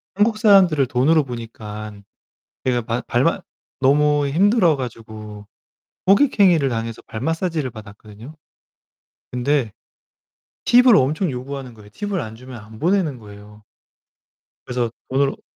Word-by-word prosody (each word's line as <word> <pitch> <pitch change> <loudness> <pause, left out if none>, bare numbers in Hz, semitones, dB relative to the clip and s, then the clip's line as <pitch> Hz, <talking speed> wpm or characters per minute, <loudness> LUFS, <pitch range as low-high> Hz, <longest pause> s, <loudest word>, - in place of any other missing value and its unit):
한국 215 +2 +2
사람들을 190 - +5
돈으로 145 +6 +2
보니까 110 -3 -8 0.7
그냥 120 -3 0
발 120 +2 -2
발맛 165 +9 0 0.4
너무 145 +1 +3
힘들어 180 - +3
가지고. 110 -4 -8 0.6
호객행위를 195 - +4
당해서 115 -2 -4
발 110 - -8
마사지를 165 -1 -2
받았거든요. 110 +5 -12 1.0
근데 125 -1 0 0.9
팁을 245 -1 +6
엄청 150 +6 +1
요구하는 130 -1 -7
거예요. 105 -1 -16
팁을 200 - -3
안 110 -2 -8
주면 125 0 -11
안 110 0 -14
보내는 170 - 0
거예요. 105 0 -14 1.0
그래서 120 -2 -2 0.2
돈을 135 +1 0
130 Hz, 280 characters per minute, -20 LUFS, 115-165 Hz, 1.0 s, 팁을